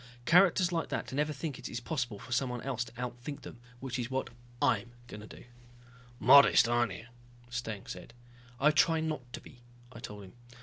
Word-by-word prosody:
Characters 180 Hz, +2 st, +5 dB
like 165 Hz, -1 st, -1 dB
that -, -, -4 dB
never 150 Hz, +2 st, 0 dB
think 145 Hz, -1 st, -5 dB
it 120 Hz, 0 st, -6 dB
possible 125 Hz, -6 st, -2 dB
for 125 Hz, -, -12 dB
someone 125 Hz, -1 st, -1 dB
else 130 Hz, -3 st, -2 dB
to -, -, -13 dB
outthink 125 Hz, +3 st, -6 dB
them. 120 Hz, -, -11 dB, 0.2 s
Which 130 Hz, -1 st, -4 dB
is 120 Hz, -1 st, -3 dB
what 130 Hz, -1 st, -2 dB, 0.3 s
I'm 120 Hz, 0 st, +1 dB
going 105 Hz, -3 st, -9 dB
to 105 Hz, -, -11 dB
do." -, -, -12 dB, 0.8 s
"Modest, 140 Hz, -4 st, +7 dB
aren't 120 Hz, -3 st, +1 dB
you," 115 Hz, -, -9 dB, 0.5 s
Steng 110 Hz, -5 st, -4 dB
said. 90 Hz, +6 st, -9 dB, 0.4 s
"I 150 Hz, +2 st, +5 dB
try 160 Hz, +2 st, +3 dB
not 155 Hz, -6 st, -4 dB
to -, -, -5 dB
be," 125 Hz, -, -16 dB, 0.3 s
I 115 Hz, -, -10 dB
told 105 Hz, -2 st, -8 dB
him. 95 Hz, -, -13 dB
125 Hz, 185 wpm, -31 LUFS, 120-145 Hz, 0.8 s, Modest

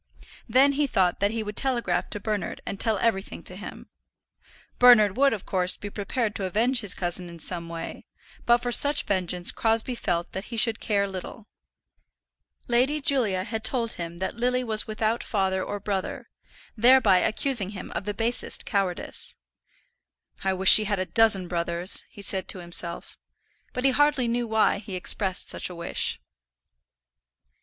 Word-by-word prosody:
Then 265 Hz, +5 st, +4 dB
he 285 Hz, +1 st, 0 dB
thought 185 Hz, -8 st, 0 dB
that 200 Hz, +1 st, +1 dB
he 225 Hz, 0 st, -3 dB
would 210 Hz, 0 st, -7 dB
telegraph 235 Hz, -10 st, -1 dB
to 210 Hz, -, -4 dB
Bernard 210 Hz, 0 st, -4 dB
and 200 Hz, -, -6 dB
tell 220 Hz, -3 st, 0 dB
everything 200 Hz, -2 st, -2 dB
to -, -, -1 dB
him. -, -, -10 dB, 0.9 s
Bernard 225 Hz, -5 st, +6 dB
would, 275 Hz, +2 st, +3 dB
of 210 Hz, -4 st, -5 dB
course, 185 Hz, -1 st, +1 dB
be 205 Hz, -, -8 dB
prepared 210 Hz, +2 st, -3 dB
to 200 Hz, -3 st, -4 dB
avenge 230 Hz, +7 st, +1 dB
his 205 Hz, -4 st, +3 dB
cousin 175 Hz, 0 st, -3 dB
in 170 Hz, -, -11 dB
some 170 Hz, +1 st, -2 dB
way, 165 Hz, 0 st, -8 dB, 0.4 s
but 240 Hz, 0 st, +5 dB
for 245 Hz, -, -2 dB
such 285 Hz, +4 st, +6 dB
vengeance 180 Hz, -2 st, +1 dB
Crosbie 225 Hz, +2 st, 0 dB
felt 175 Hz, -7 st, -3 dB
that 190 Hz, +2 st, -6 dB
he 235 Hz, -, -8 dB
should 225 Hz, 0 st, +2 dB
care 200 Hz, -2 st, -1 dB
little. 195 Hz, +3 st, -9 dB, 1.2 s
Lady 255 Hz, +5 st, +1 dB
Julia 230 Hz, -10 st, 0 dB
had 220 Hz, +2 st, -5 dB
told 235 Hz, -3 st, +2 dB
him 170 Hz, 0 st, -3 dB
that 190 Hz, +5 st, -4 dB
Lily 250 Hz, +2 st, -1 dB
was 220 Hz, -3 st, +3 dB
without 220 Hz, +1 st, -2 dB
father 190 Hz, -2 st, -1 dB
or 205 Hz, -, -5 dB
brother, 195 Hz, -2 st, -5 dB, 0.4 s
thereby 230 Hz, -4 st, +5 dB
accusing 220 Hz, -2 st, +1 dB
him 200 Hz, -3 st, -9 dB
of -, -, -5 dB
the 205 Hz, -, -3 dB
basest 235 Hz, +2 st, -1 dB
cowardice. 195 Hz, -4 st, -2 dB, 1.1 s
"I 190 Hz, 0 st, 0 dB
wish 190 Hz, +1 st, +6 dB
she 215 Hz, -, +9 dB
had 205 Hz, -1 st, -1 dB
a 185 Hz, -, -2 dB
dozen 205 Hz, -4 st, +2 dB
brothers," 170 Hz, +1 st, 0 dB
he 200 Hz, -, -9 dB
said 190 Hz, -1 st, +1 dB
to -, -, -3 dB
himself. 175 Hz, -1 st, -3 dB, 0.5 s
But 250 Hz, -, -5 dB
he 270 Hz, -, +4 dB
hardly 290 Hz, -2 st, +2 dB
knew 235 Hz, 0 st, -2 dB
why 220 Hz, -2 st, +1 dB
he 200 Hz, -2 st, -8 dB
expressed 190 Hz, +1 st, -2 dB
such -, -, -2 dB
a 180 Hz, -, -9 dB
wish. 170 Hz, 0 st, -2 dB
210 Hz, 170 wpm, -25 LUFS, 185-235 Hz, 1.2 s, she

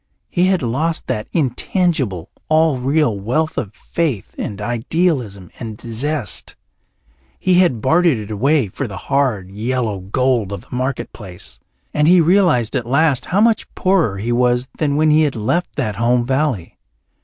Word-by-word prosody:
He 180 Hz, 0 st, +2 dB
had 185 Hz, -5 st, +1 dB
lost 155 Hz, +8 st, -1 dB
that 105 Hz, -, -3 dB
intangible, 135 Hz, -, -1 dB, 0.2 s
all 155 Hz, -3 st, +3 dB
real 135 Hz, -5 st, +1 dB
wealth 155 Hz, +10 st, -1 dB
of 100 Hz, -, -3 dB
faith 150 Hz, -, -3 dB
and 100 Hz, -, -5 dB
idealism 120 Hz, -, -1 dB
and 110 Hz, -3 st, -7 dB
zest; 120 Hz, +1 st, -2 dB, 0.8 s
he 180 Hz, -1 st, +3 dB
had 150 Hz, -12 st, +2 dB
bartered 160 Hz, +1 st, +3 dB
it 105 Hz, 0 st, -7 dB
away 135 Hz, +6 st, +2 dB
for 125 Hz, +8 st, -4 dB
the 100 Hz, -3 st, -7 dB
hard, 125 Hz, -10 st, -1 dB
yellow 110 Hz, 0 st, -2 dB
gold 115 Hz, +2 st, 0 dB
of 100 Hz, -3 st, -5 dB
the -, -, -21 dB
marketplace, 120 Hz, -7 st, -4 dB, 0.3 s
and 150 Hz, 0 st, +2 dB
he 180 Hz, +1 st, +7 dB
realized 165 Hz, -, +3 dB
at 120 Hz, -, -2 dB
last 140 Hz, -2 st, +2 dB
how 195 Hz, +3 st, +2 dB
much 225 Hz, -1 st, +2 dB
poorer 180 Hz, -, +2 dB
he 110 Hz, +5 st, -2 dB
was 125 Hz, +1 st, +2 dB
than 145 Hz, -2 st, +1 dB
when 155 Hz, +1 st, +3 dB
he 155 Hz, +1 st, +5 dB
had 145 Hz, -4 st, +1 dB
left 145 Hz, +11 st, -1 dB
that 110 Hz, -8 st, -2 dB
home 120 Hz, +1 st, +2 dB
valley. 130 Hz, -, -1 dB
130 Hz, 155 wpm, -19 LUFS, 110-155 Hz, 0.8 s, he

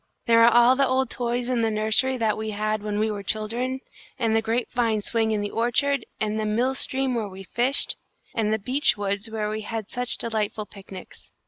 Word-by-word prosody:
There 230 Hz, -2 st, +5 dB
are 235 Hz, -, +7 dB
all 240 Hz, +2 st, +6 dB
the 275 Hz, 0 st, +3 dB
old 260 Hz, +1 st, +1 dB
toys 240 Hz, 0 st, -2 dB
in 250 Hz, -2 st, 0 dB
the 225 Hz, -, +2 dB
nursery 220 Hz, +5 st, +1 dB
that 220 Hz, -3 st, +1 dB
we 220 Hz, 0 st, -4 dB
had 215 Hz, 0 st, -1 dB
when 210 Hz, 0 st, -3 dB
we 215 Hz, +1 st, +1 dB
were 205 Hz, -1 st, -4 dB
children, 235 Hz, +6 st, -3 dB, 0.4 s
and 225 Hz, -4 st, +1 dB
the 225 Hz, -, +3 dB
grape 230 Hz, +2 st, -1 dB
vine 225 Hz, -4 st, +1 dB
swing 225 Hz, 0 st, 0 dB
in 215 Hz, -1 st, 0 dB
the 205 Hz, -, -3 dB
orchard, 245 Hz, +3 st, +1 dB
and 215 Hz, 0 st, -1 dB
the 215 Hz, -, -1 dB
mill 240 Hz, +5 st, +1 dB
stream 265 Hz, -1 st, 0 dB
where 220 Hz, -4 st, -2 dB
we 190 Hz, 0 st, -10 dB
fished, 245 Hz, +8 st, +2 dB, 0.4 s
and 215 Hz, -2 st, 0 dB
the 220 Hz, -, +2 dB
beech 255 Hz, +4 st, +1 dB
woods 200 Hz, +2 st, -1 dB
where 215 Hz, -1 st, -2 dB
we 215 Hz, 0 st, -3 dB
had 220 Hz, -1 st, -5 dB
such 245 Hz, -1 st, 0 dB
delightful 215 Hz, -2 st, -2 dB
picnics. 195 Hz, -2 st, -12 dB
225 Hz, 215 wpm, -25 LUFS, 215-245 Hz, 0.4 s, are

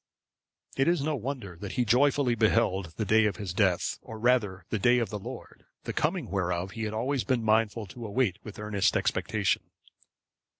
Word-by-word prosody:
It 135 Hz, -, +2 dB
is 170 Hz, -4 st, +2 dB
no 155 Hz, 0 st, 0 dB
wonder 125 Hz, -9 st, -5 dB
that 100 Hz, +2 st, -6 dB
he 125 Hz, -, +1 dB
joyfully 135 Hz, +2 st, +3 dB
beheld 110 Hz, -6 st, +1 dB
the 110 Hz, -, -1 dB
day 110 Hz, +2 st, +4 dB
of 105 Hz, -, 0 dB
his 100 Hz, -5 st, -5 dB
death, 95 Hz, -2 st, +1 dB
or 110 Hz, -, -9 dB
rather 110 Hz, -6 st, +1 dB
the 110 Hz, -, 0 dB
day 120 Hz, +5 st, +4 dB
of 115 Hz, -5 st, -1 dB
the 105 Hz, -, -3 dB
Lord, -, -, -9 dB, 0.2 s
the -, -, -4 dB
coming -, -, -1 dB
whereof 90 Hz, -1 st, -1 dB
he 110 Hz, +1 st, -4 dB
had 105 Hz, -, -3 dB
always 130 Hz, +3 st, 0 dB
been 125 Hz, -4 st, 0 dB
mindful 110 Hz, 0 st, +2 dB
to 115 Hz, +4 st, -8 dB
await 105 Hz, -3 st, 0 dB
with 110 Hz, -1 st, -9 dB
earnest 105 Hz, -2 st, +1 dB
expectation. -, -, 0 dB
110 Hz, 185 wpm, -28 LUFS, 100-125 Hz, 0.2 s, day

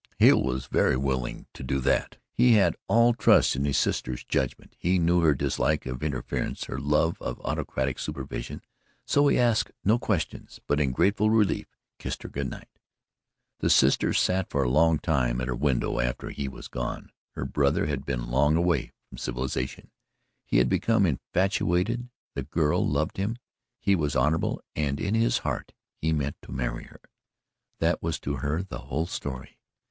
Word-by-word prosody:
Hale -, -, +6 dB
was 65 Hz, 0 st, -2 dB
very -, -, +2 dB
willing 65 Hz, -2 st, -2 dB
to -, -, -10 dB
do 65 Hz, +1 st, -1 dB
that. -, -, 0 dB
He 125 Hz, -1 st, +5 dB
had 105 Hz, -3 st, +4 dB
all 115 Hz, +1 st, +5 dB
trust 115 Hz, -, +4 dB
in 70 Hz, +2 st, -1 dB
his 70 Hz, -1 st, +1 dB
sister's 60 Hz, -1 st, -1 dB
judgment, 65 Hz, -, -2 dB
he 90 Hz, +2 st, +2 dB
knew 85 Hz, +1 st, +3 dB
her 80 Hz, -3 st, +4 dB
dislike 75 Hz, +2 st, 0 dB
of 65 Hz, -1 st, -5 dB
interference, 75 Hz, -4 st, -3 dB
her 65 Hz, -, -5 dB
love 75 Hz, +3 st, +1 dB
of -, -, -4 dB
autocratic 65 Hz, 0 st, -2 dB
supervision, 70 Hz, -5 st, -5 dB, 0.4 s
so 145 Hz, 0 st, +3 dB
he -, -, +3 dB
asked 120 Hz, -3 st, +2 dB, 0.2 s
no 110 Hz, +4 st, +4 dB
questions, 100 Hz, -8 st, -3 dB
but 75 Hz, -, +1 dB
in 70 Hz, -3 st, +2 dB
grateful 100 Hz, -, +2 dB
relief 110 Hz, -2 st, +2 dB, 0.3 s
kissed -, -, -5 dB
her -, -, -7 dB
good 70 Hz, -2 st, -3 dB
night. -, -, -12 dB, 0.8 s
The -, -, +1 dB
sister -, -, +4 dB
sat 95 Hz, 0 st, +1 dB
for 70 Hz, -, +1 dB
a 65 Hz, -, +1 dB
long 80 Hz, +3 st, +4 dB
time 65 Hz, -7 st, 0 dB
at 65 Hz, -, -2 dB
her 65 Hz, -, -1 dB
window 65 Hz, -2 st, 0 dB
after -, -, -2 dB
he 70 Hz, -, -4 dB
was 65 Hz, -, -8 dB
gone. 60 Hz, -1 st, -5 dB, 0.2 s
Her -, -, -3 dB
brother 70 Hz, +4 st, +1 dB
had 70 Hz, -2 st, -2 dB
been -, -, -3 dB
long 75 Hz, +4 st, +3 dB
away 85 Hz, -5 st, +1 dB
from -, -, -11 dB
civilization; 65 Hz, +1 st, -4 dB, 0.6 s
he -, -, +2 dB
had -, -, +4 dB
become 110 Hz, -, +2 dB
infatuated, 95 Hz, -, 0 dB, 0.2 s
the 70 Hz, -, -3 dB
girl 75 Hz, +2 st, +1 dB
loved 75 Hz, +2 st, -1 dB
him, 105 Hz, +5 st, -1 dB, 0.4 s
he 100 Hz, -, +3 dB
was 75 Hz, -5 st, -1 dB
honourable 75 Hz, +6 st, +1 dB
and 70 Hz, -2 st, -1 dB
in 100 Hz, -, -1 dB
his 115 Hz, +1 st, +3 dB
heart -, -, -3 dB, 0.2 s
he 80 Hz, -, -1 dB
meant 70 Hz, -2 st, -1 dB
to -, -, -12 dB
marry 65 Hz, -1 st, -3 dB
her -, -, -17 dB, 0.8 s
that 80 Hz, 0 st, +1 dB
was 80 Hz, -1 st, -2 dB
to 70 Hz, 0 st, -2 dB
her 75 Hz, +7 st, -1 dB
the 95 Hz, -, -7 dB
whole 75 Hz, +5 st, -2 dB
story. 65 Hz, -6 st, -6 dB
75 Hz, 175 wpm, -27 LUFS, 65-90 Hz, 0.8 s, Hale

